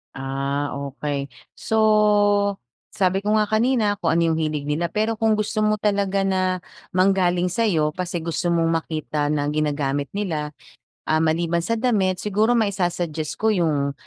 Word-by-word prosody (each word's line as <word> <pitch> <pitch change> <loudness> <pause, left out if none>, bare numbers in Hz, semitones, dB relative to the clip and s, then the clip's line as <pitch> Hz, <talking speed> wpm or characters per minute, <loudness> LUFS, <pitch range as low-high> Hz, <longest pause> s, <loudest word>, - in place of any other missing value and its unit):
Ah, 140 +2 -2
okey. 140 0 -4 0.3
So, 220 - -2 1.1
sabi 190 -3 0
ko 210 +2 0
nga 215 - +4
kanina 220 -2 +2
kung 165 -1 +1
ano 165 -1 +2
yung 160 - -1
hilig 155 -2 -2
nila 150 +4 -1
pero 215 +5 -1
kung 220 -1 +3
gusto 215 +1 -2
mo 215 0 +2
talaga 200 -2 0
na 185 -2 0 0.3
manggaling 180 -1 +2
sa'yo 170 -8 +1
kasi 175 -1 -4
gusto 170 +1 -2
mong 165 -1 +2
makita 155 -2 -3
na 145 -1 0
ginagamit 145 -2 -1
nila. 155 -7 -3 0.5
Ah, 155 0 +1
maliban 165 +1 +1
sa 230 +7 -1
damit, 210 -6 +1
siguro 210 +5 +1
maisusuggest 175 -7 -1
ko 220 +1 +2
yung 150 -7 0
175 Hz, 150 wpm, -22 LUFS, 150-205 Hz, 1.1 s, nga